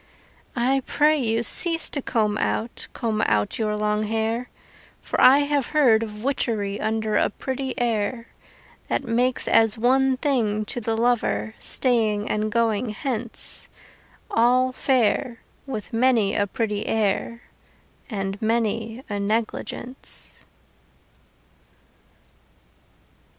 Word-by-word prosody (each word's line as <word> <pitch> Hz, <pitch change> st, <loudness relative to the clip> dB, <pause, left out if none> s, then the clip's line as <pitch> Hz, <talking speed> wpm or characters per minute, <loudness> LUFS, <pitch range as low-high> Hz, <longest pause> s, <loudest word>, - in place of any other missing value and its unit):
I 260 Hz, +3 st, +2 dB
pray 300 Hz, +1 st, +3 dB
you, 230 Hz, -2 st, 0 dB
cease 330 Hz, -, +2 dB
to 280 Hz, -, -2 dB
comb 215 Hz, -5 st, 0 dB
out, 230 Hz, +2 st, -2 dB
Comb 220 Hz, -3 st, -2 dB
out 105 Hz, -, 0 dB
your 215 Hz, -1 st, 0 dB
long 210 Hz, 0 st, 0 dB
hair, 225 Hz, +3 st, -1 dB, 0.5 s
For -, -, -2 dB
I 275 Hz, +3 st, +7 dB
have 285 Hz, -3 st, 0 dB
heard 255 Hz, -8 st, +4 dB
of 210 Hz, -1 st, -6 dB
witchery 215 Hz, -7 st, -1 dB
Under 220 Hz, 0 st, 0 dB
a -, -, +2 dB
pretty 265 Hz, +3 st, -4 dB
air, 230 Hz, 0 st, -1 dB, 0.6 s
That -, -, -1 dB
makes 245 Hz, +1 st, +1 dB
as 225 Hz, -1 st, +4 dB
one 260 Hz, +3 st, +3 dB
thing 225 Hz, -7 st, 0 dB
to 245 Hz, +3 st, -4 dB
the 225 Hz, 0 st, -1 dB
lover 220 Hz, -, 0 dB
Staying 220 Hz, -5 st, +1 dB
and 215 Hz, 0 st, -1 dB
going 230 Hz, 0 st, +1 dB
hence, 235 Hz, 0 st, -3 dB, 0.6 s
All 250 Hz, +2 st, +3 dB
fair, 250 Hz, -1 st, 0 dB, 0.3 s
with 225 Hz, -6 st, -6 dB
many 230 Hz, -4 st, +3 dB
a 205 Hz, -, +1 dB
pretty 210 Hz, 0 st, -2 dB
air 220 Hz, +2 st, -1 dB, 0.7 s
And 195 Hz, -3 st, -4 dB
many 225 Hz, +1 st, -1 dB
a 205 Hz, -3 st, -3 dB
negligence. 225 Hz, +4 st, -3 dB
230 Hz, 115 wpm, -23 LUFS, 215-255 Hz, 0.7 s, I